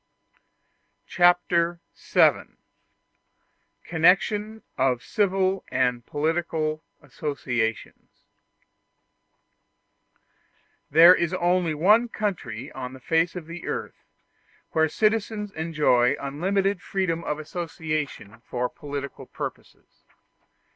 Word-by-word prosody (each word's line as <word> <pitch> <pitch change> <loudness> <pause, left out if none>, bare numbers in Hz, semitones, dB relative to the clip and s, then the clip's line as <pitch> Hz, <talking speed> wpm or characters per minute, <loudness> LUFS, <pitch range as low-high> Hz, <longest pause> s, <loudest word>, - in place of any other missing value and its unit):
Chapter 175 -1 +2 0.2
VII: - - +2 1.3
Connection 205 +6 +2
Of 130 -2 +1
Civil 195 -2 0
And 125 -2 0
Political 155 0 -1 0.2
Associations 125 -6 -4 2.6
There 165 +4 +8
is 175 0 0
only 175 -2 +1
one 210 +9 +4
country 145 - -4
on 130 -1 -7
the 130 - -11
face 165 +6 +1
of 175 -3 -6
the 165 +1 -8
earth - - -5 0.7
where 160 0 +3
the - - -12
citizens 215 0 0
enjoy 150 -7 +2
unlimited 190 +7 -1
freedom 180 -5 -2
of 150 - -2
association 155 - -5
for 125 0 -3
political 145 -3 -7
purposes. - - -9
165 Hz, 85 wpm, -25 LUFS, 145-185 Hz, 2.6 s, There